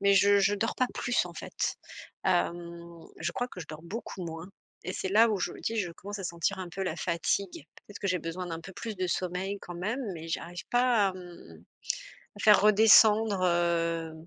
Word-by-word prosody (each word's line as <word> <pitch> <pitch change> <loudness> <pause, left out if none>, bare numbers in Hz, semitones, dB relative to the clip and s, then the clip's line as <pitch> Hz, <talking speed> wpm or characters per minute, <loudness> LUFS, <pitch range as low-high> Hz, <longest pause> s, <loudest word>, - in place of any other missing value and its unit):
Mais 200 0 +4
je 200 +1 +5
je 200 +1 +3
dors 225 +3 -1
pas 255 - +2
plus 245 -1 0
en - - -9
fait. - - -3 0.5
Hem, 170 -1 -1 0.2
je 170 +1 -2
crois 245 0 -2
que 180 - -9
je - - -7
dors 155 0 -9
beaucoup 190 +1 -6
moins 165 +2 -7 0.4
et 185 - -3
c'est - - -3
là, 225 +3 +6
où 210 - 0
je 180 - -2
me - - -11
dis, 225 - -2
je 180 -6 -1
commence 205 +4 -8
à 190 - -6
sentir 170 +3 -1
un 185 -2 -5
peu 195 +3 -4
la 185 - -2
fatigue. 170 0 -1 0.2
Peut-être 205 - -10
que 200 - -3
j'ai 185 -1 +1
besoin 170 +3 -5
d'un 165 -1 -5
peu 190 +3 -10
plus 220 +2 -6
de 185 0 -1
sommeil 185 +3 -2
quand 175 - -8
même, 210 +9 -2
mais 165 0 -8
j'arrive 170 +1 -4
pas 245 -4 +4
à, 190 - -3
mmh, 180 -2 -12 0.7
à - - -9
faire 210 -2 +7
redescendre, 215 -1 +6
heu, 170 -2 +1
185 Hz, 215 wpm, -29 LUFS, 170-205 Hz, 0.7 s, faire